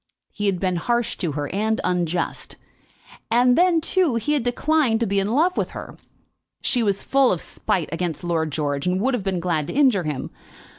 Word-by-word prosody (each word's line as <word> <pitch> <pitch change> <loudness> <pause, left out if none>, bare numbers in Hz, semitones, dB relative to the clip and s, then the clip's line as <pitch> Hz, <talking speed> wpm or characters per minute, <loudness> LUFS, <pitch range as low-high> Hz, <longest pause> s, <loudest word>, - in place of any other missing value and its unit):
He 205 -1 -2
had 190 -3 0
been 185 -1 0
harsh 235 +6 0
to 165 -6 -2
her, 145 0 -3
and 220 +2 0
unjust; 175 -1 -1 0.7
and 245 +2 +4
then, 350 0 +4
too, 335 -4 +1
he 230 +6 0
had 290 - +1
declined 245 0 +1
to - - +3
be 200 -1 +1
in 195 - 0
love 330 +9 +2
with - - -2
her! - - -8 0.7
She 245 - +1
was 200 -3 0
full 275 -2 +3
of 180 - 0
spite 165 0 -2
against 165 -1 -3
Lord 165 -3 -1
George, 145 0 -2
and 180 +1 +1
would 260 +6 +1
have 245 - 0
been 190 -2 -1
glad 165 -4 -1
to - - -5
injure 260 -8 +4
him. 150 -5 -4
200 Hz, 200 wpm, -22 LUFS, 175-250 Hz, 0.7 s, and